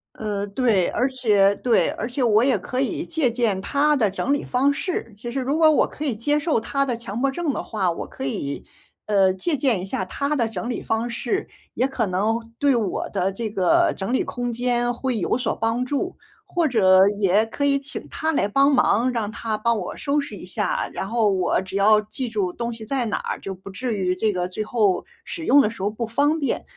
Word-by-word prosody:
呃， 205 -2 -3
对， 200 -4 +2
而 255 +3 0
且 205 -6 +3
对， 240 -3 +3
而 225 - -4
且 250 +1 -2
我 225 0 +4
也 265 -3 +3
可 255 +7 -4
以 275 +4 -1
借 315 -8 0
鉴 225 -5 0
他 295 +7 +2
的 220 -7 +2
整 255 +7 -2
理 285 - +1
方 265 +3 +2
式， 295 - -3
其 240 +2 -6
实 270 - -2
如 280 +5 0
果 315 -1 +6
我 - - +3
可 305 - -6
以 255 - 0
接 290 +7 +1
受 300 -5 +1
他 275 +5 -1
的 245 -3 -1
强 230 -1 -5
迫 275 +1 +1
症 330 +1 -1
的 - - -3
话， 195 -5 -1
我 - - -5
可 - - -8
以， 140 +1 -3 0.4
呃， 195 -3 +4
借 290 - -1
鉴 250 -9 +1
一 - - -5
下 190 -1 -2
他 280 +9 -2
的 235 -4 +1
整 225 +2 -5
理 240 - -3
方 225 +2 -1
式， 255 - -2 0.3
也 260 - +1
可 255 -5 -1
能 220 +5 -1
对 285 -2 +3
我 215 -5 -1
的 195 -1 0
这 220 +2 -4
个 190 -3 +3
整 195 +5 -3
理 260 - +2
空 245 -1 -4
间 240 0 0
会 250 -1 -2
有 190 - 0
所 250 -3 -1
帮 225 +2 0
助。 290 +8 -2 0.3
或 345 -4 0
者 190 -5 +5
也 200 +2 +4
可 285 +5 -2
以 275 0 +3
请 280 - -6
他 320 0 -1
来 205 - +2
帮 275 +6 +3
忙， 250 -1 +3
让 220 -3 -2
他 225 -2 -3
帮 235 +2 +1
我 - - -6
收 290 0 0
拾 - - -7
一 - - -9
下， - - -1
然 190 - -4
后 230 -2 +2
我 185 -3 +1
只 190 0 -8
要 210 +2 +5
记 230 +4 -4
住 195 -5 -1
东 235 0 -3
西 225 -1 -8
在 255 -1 -1
哪 - - -1
儿， - - -4
就 195 -1 -6
不 190 +1 -11
至 240 +2 -3
于 185 -2 0
这 215 +3 +1
个 180 -1 -2
最 185 +4 -4
后 215 -4 +1 0.2
使 335 -1 -6
用 285 +2 +6
的 210 - +2
时 230 - -10
候 200 - +1
不 225 +2 -4
方 285 +7 +1
便。 280 - -1
235 Hz, 250 characters per minute, -23 LUFS, 205-270 Hz, 0.4 s, 果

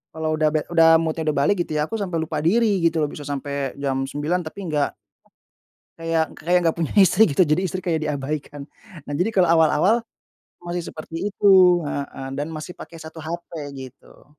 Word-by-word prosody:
kalau 155 0 -1
udah 155 - +3
bad 150 - 0
udah 165 -1 +6
mood-nya 160 0 -2
udah 150 - +1
balik 140 +9 +2
gitu 155 - -4
ya, 150 - +1
aku 225 - -3
sampai 180 -4 -3
lupa 155 -2 -3
diri, 205 +4 +2
gitu 165 -2 +2
loh, 145 - -1
bisa 145 -1 -8
sampai 140 -1 -3
jam 135 -1 -2
9, 150 +6 -1
tapi 180 - -9
nggak 145 -1 0 1.0
kayak 165 -1 -1
kayak 180 +2 +3
nggak 165 - +2
punya 165 -3 -2
istri 190 +2 +6
gitu, 165 +5 +3
jadi 155 +5 +1
istri 185 0 -2
kayak 165 -3 -1
diabaikan. 145 -1 -4 0.4
Nah 145 - -4
jadi 180 +9 0
kalau 185 -4 +3
awal-awal, 165 +7 +3 0.6
masih 175 0 -3
seperti 165 +5 -5
itu 185 -4 +5
heeh, 140 -2 -5
dan 145 +3 -3
masih 160 +2 -7
pakai 165 - -11
1 160 0 -10
HP 170 +2 -6 0.3
gitu. 130 0 -13
160 Hz, 190 wpm, -22 LUFS, 145-175 Hz, 1.0 s, udah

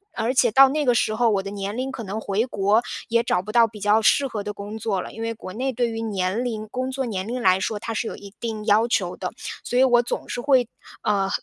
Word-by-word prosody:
而 230 +3 0
且 250 -3 +4
到 270 +3 +7
那 300 +1 0
个 245 -1 +3
时 215 - +1
候， 230 +1 +2
我 195 -2 +1
的 195 - -6
年 200 +1 -4
龄 260 +1 -2
可 230 - -6
能 205 +3 -4
回 210 +3 0
国 205 +1 +2 0.3
也 235 0 +3
找 180 -6 +1
不 215 - -6
到 230 -1 +5
比 210 -1 -12
较 210 +2 +3
适 280 +5 +4
合 210 -5 -4
的 210 - -4
工 205 +2 -7
作 200 -4 -1
了， - - -8
因 225 - -8
为 230 0 -2
国 185 - -9
内 260 +4 -1
对 240 -1 0
于 225 0 -4
年 200 +1 -1
龄， 215 -3 -4
工 255 +1 -2
作 265 0 -2
年 195 -3 -3
龄 250 +2 -3
来 185 -1 +4
说， 210 +2 -2
它 225 - -4
是 220 +1 -2
有 - - -5
一 200 0 -12
定 220 -2 -4
要 220 +3 +4
求 - - 0
的， - - -4 0.3
所 245 - -2
以 260 - +6
我 245 -2 +5
总 240 - -4
是 245 - -3
会， 260 -4 +3 0.4
呃， 195 -1 +1
225 Hz, 295 characters per minute, -23 LUFS, 205-245 Hz, 0.4 s, 到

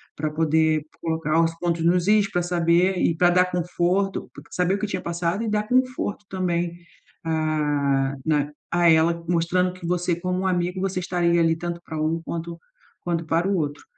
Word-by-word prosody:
para 155 0 -2
poder 160 0 +2 0.2
colocar 160 -1 +1
os 165 0 0
pontos 170 -2 -1
nos 175 +1 +2
is 210 -1 +4
para 175 - +1
saber 175 +1 +2
e 165 - +2
para 175 +1 +5
dar 180 +1 +3
conforto, 180 +2 -1
po - - -11
saber 180 +1 +1
o - - -4
que 210 - -2
tinha 185 -2 -3
passado 170 +4 -2
e 225 - -2
dar 210 0 -1
conforto 255 -4 0
também, 175 -2 -1 0.5
ah, 145 -4 0
na 150 -2 +1 0.2
a 175 0 +4
ela, 165 +1 +3
mostrando 180 +2 +1
que 185 -2 -10
você 180 0 0
como 180 +1 -2
um 190 - -1
amigo, 180 0 -1
você 190 -1 -1
estaria 175 -1 +1
ali 165 0 +3
tanto 170 0 -5
para 160 -1 -4
um 160 +2 0
quanto 170 0 -5 0.4
quanto 170 -1 -2
para 165 +3 +1
o 200 - +1
outro. 145 -3 -3
170 Hz, 190 wpm, -24 LUFS, 160-180 Hz, 0.5 s, para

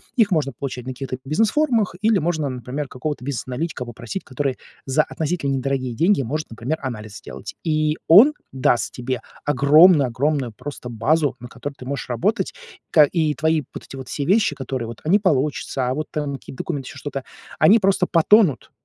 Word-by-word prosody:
Их 225 -5 +4
можно 150 -5 +1
получать 125 -3 -5
на 130 - -4
каких-то 130 0 -5
бизнес-форумах, 225 - +1
или 220 -1 +4
можно, 155 -4 -1
например, 130 +3 -5
какого-то 130 0 -5
бизнес-аналитика 130 +2 -4
попросить, 120 - -6
который 135 -1 -2 0.3
за 135 +3 +2
относительно 155 -3 -2
недорогие 130 -2 -2
деньги 175 - +3
может, 150 +6 -3
например, 115 +8 -3
анализ 110 -6 -6
сделать. - - -9
И, 155 -1 +1
он 220 - +8 0.2
даст 130 -2 +1
тебе 130 +1 -3 0.2
огромную 145 +1 +6
огромную 135 +1 -1
просто 125 +2 -8
базу, 140 +6 +1
на 125 - -9
которой 130 +3 -7
ты 130 - -12
можешь 135 -1 -4
работать, 160 - 0 0.4
ка 155 - +7
и 155 0 0
твои 160 0 +1
вот - - -8
эти - - -10
вот 130 -1 -8
все 140 - -3
вещи, 195 -3 +3
которые 130 -3 -4
вот, 115 -1 -8
а 155 - -3
не 200 +4 +5
получиться, 145 -7 0
а - - 0
вот 155 +3 -3
там 150 -3 -2
какие-то 135 - -11
документы, 140 -5 -4
ещё - - -11
что-то, 135 -1 -5 0.4
они 200 +9 +6
просто 195 -2 +2
потонут, 175 - +4
145 Hz, 180 wpm, -22 LUFS, 130-160 Hz, 0.4 s, он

